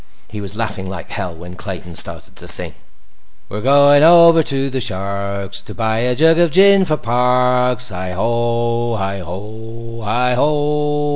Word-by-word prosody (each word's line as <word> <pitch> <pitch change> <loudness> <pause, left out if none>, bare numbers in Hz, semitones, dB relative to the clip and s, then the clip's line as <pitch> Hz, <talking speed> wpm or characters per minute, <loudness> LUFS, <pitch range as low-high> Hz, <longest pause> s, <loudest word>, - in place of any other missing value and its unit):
He 105 -1 -8
was 100 +1 -5
laughing 100 -4 -4
like 95 -4 -8
hell 90 -3 -4
when 90 +2 -11
Clayton 90 -3 -8
started - - 0
to - - -8
sing. - - +2 0.8
"We're 105 - -6
going 145 +2 +5
over 170 0 +6
to 135 -2 -2
the 130 0 -3
Shark's 100 -2 -4
To - - -12
buy 110 -1 -1
a 125 +1 0
jug 160 +4 +3
of 170 -1 +3
gin 195 +3 +5
for 155 -3 -1
Parks! 125 0 0
Hi 90 -1 -6
ho, 115 +2 -1
hi 100 -1 -4
ho, 110 +6 -9
hi 125 +4 0
ho!" 150 +2 0
120 Hz, 160 wpm, -17 LUFS, 100-140 Hz, 0.8 s, over